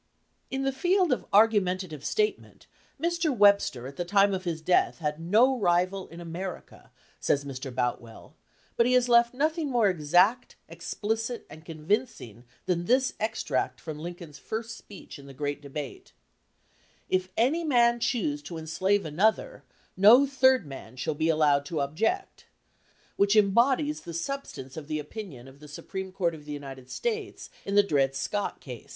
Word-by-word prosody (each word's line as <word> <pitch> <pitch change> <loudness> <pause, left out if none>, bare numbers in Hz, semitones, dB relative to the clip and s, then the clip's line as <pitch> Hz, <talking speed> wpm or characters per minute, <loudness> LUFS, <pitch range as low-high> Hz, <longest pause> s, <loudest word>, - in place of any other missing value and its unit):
"In 270 0 -3
the 270 - +1
field 355 +5 +1
of 250 - -1
argumentative 185 -7 +2
statement, 425 - -2 0.3
Mr. 340 +1 0
Webster 200 - +3
at 135 +1 -9
the 175 - -1
time 200 +2 +3
of 185 0 -4
his 165 -2 -2
death 175 +3 +2
had 150 -2 -3
no 230 +10 +3
rival 185 +1 +1
in 170 - -12
America," 175 +2 -8 0.3
says 140 0 0
Mr. 135 0 -6
Boutwell, 120 -2 -4 0.4
"but 235 - +4
he 250 - +2
has 250 -1 +4
left 235 0 +4
nothing 310 +2 0
more 240 -5 +3
exact, 180 - +2
explicit, 225 +3 -4
and 155 +2 -12
convincing 160 - -3 0.2
than 175 -2 -1
this 255 +5 +2
extract 210 - -2
from 155 -1 -7
Lincoln's 170 -3 -8
first 225 +6 -5
speech 200 -8 -12
in 140 - -13
the 135 - -12
great 145 0 -3
debate: 140 -1 -8 0.9
'If 185 0 0
any 280 +9 +2
man 240 -5 +3
choose 185 - -1
to 160 +3 -8
enslave 190 +5 0
an 155 +1 -7
other, 220 - +1 0.3
no 220 +8 +7
third 265 - +3
man 135 -4 -10
shall 140 +5 -2
be 160 +2 0
allowed 150 -3 +3
to 160 -1 -3
object,' 210 - -2 0.7
which 200 +1 +3
embodies 245 +9 +3
the 170 -1 -8
substance 170 - -5
of 155 -2 -8
the 155 0 -2
opinion 150 - -8
of 135 +1 -15
the 150 - -13
Supreme 190 +6 -7
Court 175 -3 -1
of 150 -2 -11
the 150 - -6
United 135 -3 -9
States 440 - -4
in 200 - -2
the 205 - +7
Dred 135 -7 +1
Scott 205 +8 -3
case." 125 -5 -10
185 Hz, 165 wpm, -27 LUFS, 150-235 Hz, 0.9 s, no